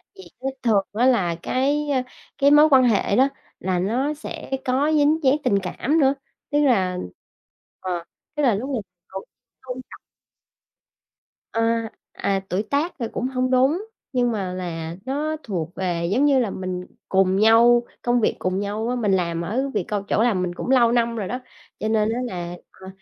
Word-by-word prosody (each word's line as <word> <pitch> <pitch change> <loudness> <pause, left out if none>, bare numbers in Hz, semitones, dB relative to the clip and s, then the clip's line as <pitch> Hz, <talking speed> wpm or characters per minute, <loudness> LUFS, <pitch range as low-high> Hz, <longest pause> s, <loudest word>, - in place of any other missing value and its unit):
Gì 385 - -12 0.2
chứ 265 - -3 0.2
thường 210 -5 +3
á 230 +4 +2
là 190 -10 +2
cái, 290 +3 0
ơ, 270 -3 +2 0.4
cái 280 +1 +4
mối 300 +1 +7
quan 265 -3 +6
hệ 220 -4 +2
đó 265 +5 +4 0.3
là 185 -1 -1
nó 245 +10 0
sẽ 300 -2 -8
có 270 +4 +2
dính 300 +2 +3
dáng 265 +1 +5
tình 200 -6 +2
cảm 280 - 0
nữa. 270 -1 +4 0.4
Tức 290 - +2
là 190 -9 +2 0.8
ờ, 180 -2 -3 0.3
tức 295 - 0
là 240 -6 +4
lúc 245 +7 -4
này 255 -5 -1 0.3
vẫn 190 - -5 0.4
tôn 255 -1 -6
trọng. - - -11 1.5
À, 230 0 0 0.2
à, 195 -1 0
tuổi 190 +4 0
tác 290 +9 -1
thì 235 - -1
cũng 250 - -2
hông 255 -1 -1
đúng, 275 +11 +2 0.3
nhưng 245 -1 +2
mà 195 -5 -3
là 170 -2 -5
nó 295 +4 -1
thuộc 175 -5 -4
về, 175 -3 -1
giống 260 +7 +3
như 280 -2 +4
là, 235 -5 0
mình 185 -1 -4 0.2
cùng 190 0 +3
nhau, 235 +3 +5 0.2
công 240 -1 +1
việc - - +1
cùng 185 +1 -1
nhau 210 +3 -2
á. 250 - 0
Mình 215 -5 0
làm 170 -3 0
ở 245 +11 -1
việc 205 -4 0
c 200 -1 -3
chỗ 215 - +1
làm 215 -7 +2
mình 180 -1 -2
cũng - - -5
lâu 245 -3 +5
năm 235 -1 +1
rồi 210 -4 -3
đó, 250 - -3 0.4
cho 215 - -2
nên 220 -1 +2
á 240 - -2
là, 175 -4 -5 0.2
ờ, 190 - -14
230 Hz, 195 wpm, -23 LUFS, 190-265 Hz, 1.5 s, mối